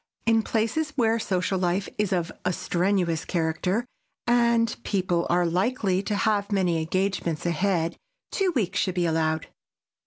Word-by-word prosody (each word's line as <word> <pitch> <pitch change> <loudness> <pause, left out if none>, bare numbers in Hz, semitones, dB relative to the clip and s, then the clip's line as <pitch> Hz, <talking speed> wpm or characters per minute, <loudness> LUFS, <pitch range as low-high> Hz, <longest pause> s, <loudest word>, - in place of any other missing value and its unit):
In 225 -1 +4
places 230 +9 -1
where 230 -3 +2
social 185 -2 0
life 180 +2 0
is 210 -2 +1
of 175 -2 0
a 180 - +1
strenuous 180 -2 0
character 180 +6 -1 0.4
and 235 -1 +3
people 180 -4 0
are 175 0 +3
likely 190 +2 +1
to 205 +1 -2
have 205 0 +1
many 180 -4 +2
engagements 175 -2 -1
ahead, 170 -1 0 0.3
two 390 -2 +1
weeks 195 -5 0
should 185 -2 0
be 175 -1 +1
allowed. 160 -1 0
190 Hz, 145 wpm, -26 LUFS, 175-220 Hz, 0.4 s, In